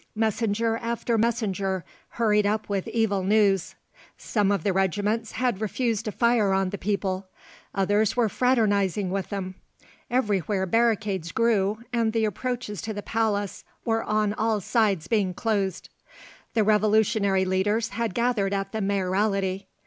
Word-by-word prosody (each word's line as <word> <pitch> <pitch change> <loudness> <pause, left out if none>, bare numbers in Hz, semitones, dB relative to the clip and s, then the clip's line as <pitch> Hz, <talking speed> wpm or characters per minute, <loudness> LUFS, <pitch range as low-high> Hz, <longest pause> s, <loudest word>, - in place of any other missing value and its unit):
Messenger 225 +1 0
after 235 0 -1
messenger 200 -6 0 0.3
hurried 210 -3 +3
up 215 +1 -1
with 200 -2 -2
evil 220 -4 +1
news. 195 -2 +2 0.4
Some 205 -3 0
of 200 -5 0
the 200 - +1
regiments 205 +4 0
had 240 -4 -1
refused 225 0 -1
to 215 - -2
fire 235 -4 +2
on 190 -1 +1
the 200 - -5
people; 195 -1 -2 0.5
others 205 +3 +2
were 240 -2 +3
fraternising 205 -6 +1
with 195 -1 -2
them; 190 -2 -4 0.6
everywhere 205 -5 0
barricades 210 -4 +1
grew 220 -1 +1
and 230 -2 +1
the 225 -1 +2
approaches 230 0 -3
to 220 -1 -5
the 205 - -5
palace 210 -3 -1 0.2
were 225 -1 +1
on 215 -1 +1
all 220 0 0
sides 200 -5 +1
being 195 -4 +1
closed. 200 -5 -1 0.7
The 220 - +4
Revolutionary 210 -2 +3
leaders 205 +5 +1
had 225 -2 -3
gathered 225 -5 +1
at 195 0 -3
the 220 - -3
Mayoralty. 195 0 0
210 Hz, 140 wpm, -25 LUFS, 195-225 Hz, 0.7 s, The